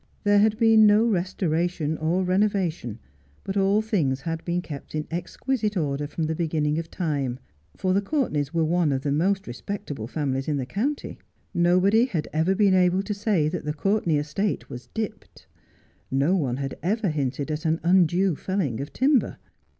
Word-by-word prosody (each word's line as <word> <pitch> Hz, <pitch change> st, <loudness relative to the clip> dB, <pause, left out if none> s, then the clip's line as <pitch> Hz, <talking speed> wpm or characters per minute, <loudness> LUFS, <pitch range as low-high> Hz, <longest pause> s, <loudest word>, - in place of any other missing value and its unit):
There 205 Hz, -1 st, +4 dB
had 215 Hz, +1 st, +3 dB
been 225 Hz, -2 st, +6 dB
no 210 Hz, +2 st, +5 dB
restoration 175 Hz, -5 st, 0 dB
or 170 Hz, +4 st, +1 dB
renovation, 185 Hz, -, 0 dB, 0.5 s
but 195 Hz, -, -4 dB
all 200 Hz, +2 st, +3 dB
things 155 Hz, -, 0 dB
had 165 Hz, +2 st, -4 dB
been 175 Hz, 0 st, -1 dB
kept 145 Hz, -2 st, -8 dB
in 155 Hz, 0 st, -2 dB
exquisite 210 Hz, +5 st, -2 dB
order 145 Hz, -2 st, -1 dB
from 160 Hz, +2 st, -4 dB
the 160 Hz, +1 st, 0 dB
beginning 155 Hz, -2 st, 0 dB
of 165 Hz, 0 st, -6 dB
time; 140 Hz, -8 st, -2 dB, 0.4 s
for 185 Hz, -1 st, 0 dB
the 200 Hz, -, +2 dB
Courtenays 195 Hz, -, -1 dB
were 165 Hz, -2 st, +1 dB
one 170 Hz, -1 st, +2 dB
of 135 Hz, -1 st, -1 dB
the 145 Hz, -, 0 dB
most 190 Hz, +6 st, +1 dB
respectable 130 Hz, -, -6 dB
families 135 Hz, -1 st, -2 dB
in 150 Hz, -2 st, 0 dB
the 130 Hz, -, -2 dB
county. 260 Hz, -, -3 dB, 0.3 s
Nobody 185 Hz, +6 st, +4 dB
had 170 Hz, -, -3 dB
ever 160 Hz, +5 st, +2 dB
been 200 Hz, -1 st, +4 dB
able 185 Hz, +1 st, +3 dB
to 210 Hz, -, -3 dB
say 200 Hz, -6 st, +1 dB
that 180 Hz, -, -4 dB
the 150 Hz, 0 st, -3 dB
Courtenay 195 Hz, -1 st, +1 dB
estate 155 Hz, +5 st, -2 dB
was 125 Hz, -2 st, -8 dB
'dipped.' 220 Hz, -, -6 dB, 0.6 s
No 140 Hz, +8 st, +2 dB
one 130 Hz, -9 st, -1 dB
had 135 Hz, -1 st, -5 dB
ever 205 Hz, +2 st, 0 dB
hinted 145 Hz, 0 st, -2 dB
at 155 Hz, +1 st, -3 dB
an 160 Hz, +1 st, +1 dB
undue 180 Hz, 0 st, +3 dB
felling 150 Hz, -, -2 dB
of 140 Hz, -, -6 dB
timber. 265 Hz, -1 st, +2 dB
175 Hz, 175 wpm, -25 LUFS, 150-200 Hz, 0.6 s, been